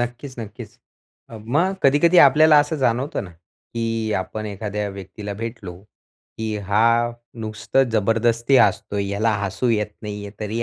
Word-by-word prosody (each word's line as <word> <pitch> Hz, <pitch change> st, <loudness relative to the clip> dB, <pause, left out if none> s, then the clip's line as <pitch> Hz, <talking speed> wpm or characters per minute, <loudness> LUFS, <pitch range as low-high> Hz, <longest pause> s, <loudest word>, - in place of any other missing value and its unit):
नक्कीच, 120 Hz, +2 st, -5 dB
नक्कीच. 110 Hz, 0 st, -9 dB, 0.5 s
अ, 115 Hz, -, -8 dB
मग 165 Hz, +10 st, +1 dB
कधी-कधी 155 Hz, +6 st, +4 dB
आपल्याला 150 Hz, +2 st, +7 dB
असं 150 Hz, +2 st, +1 dB
जाणवतं 130 Hz, -3 st, -1 dB
ना, 90 Hz, -, -11 dB
की 110 Hz, +6 st, -5 dB
आपण 110 Hz, +3 st, -5 dB
एखाद्या 105 Hz, 0 st, -4 dB
व्यक्तीला 100 Hz, +2 st, -8 dB
भेटलो, 110 Hz, -5 st, -7 dB, 0.6 s
की 110 Hz, -1 st, -2 dB
हा 115 Hz, +4 st, +2 dB, 0.3 s
नुसतं 110 Hz, +4 st, 0 dB
जबरदस्ती 115 Hz, +4 st, +2 dB
हसतोय. 100 Hz, -1 st, +2 dB
ह्याला 105 Hz, +3 st, 0 dB
हसू 110 Hz, +5 st, -2 dB
येत 105 Hz, -2 st, 0 dB
नाहीये, 105 Hz, -1 st, -6 dB
तरी 110 Hz, +3 st, -2 dB
115 Hz, 135 wpm, -21 LUFS, 105-120 Hz, 0.6 s, आपल्याला